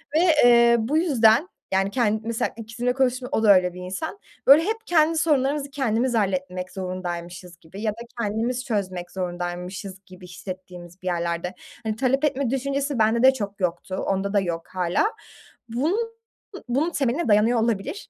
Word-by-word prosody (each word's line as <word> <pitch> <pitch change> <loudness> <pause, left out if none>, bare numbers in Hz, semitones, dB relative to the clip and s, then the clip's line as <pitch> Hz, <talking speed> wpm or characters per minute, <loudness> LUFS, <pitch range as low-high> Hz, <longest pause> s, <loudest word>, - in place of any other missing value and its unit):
Ve, - - +5 0.3
eee, 235 -1 +6
bu 265 +8 0
yüzden, 280 - +4 0.2
yani, 195 +1 +2
kend 220 -3 +1
mesela, 230 0 -2
ikizimle 235 +2 -2
konuştum, 255 -1 0
o 225 - 0
da 200 -2 +7
öyle 180 -1 +2
bir 180 - -9
insan, 190 - -5 0.3
böyle, 290 +4 +8
hep 435 +5 0
kendi 325 -1 +3
sorunlarımızı 285 -2 +1
kendimiz 255 -2 0
halletmek 185 -3 -1
zorundaymışız 180 -2 -6
gibi 180 +5 -11
ya 215 -1 0
da 215 - -12 0.2
kendimiz 235 +4 -1
çözmek 185 -7 -3
zorundaymışız 180 +1 -5
gibi 185 0 -13
hissettiğimiz 180 0 -9
bir 185 - -7
yerlerde. 170 0 -2 0.3
Hani, 220 -1 -2
talep 270 +4 +1
etme 275 -3 0
düşüncesi 275 0 -1
bende 225 +3 +3
de 265 - +7
çok 205 -5 -5
yoktu. 180 0 -2
Onda 195 +1 -1
da 205 - +4
yok 170 -3 -3
hâlâ. 180 - 0 0.6
Bun 275 - 0 0.7
bunun 280 +7 +1
temeline 275 +1 0
dayanıyor 220 +3 +4
olabilir. 235 - -2
220 Hz, 160 wpm, -24 LUFS, 185-260 Hz, 0.7 s, böyle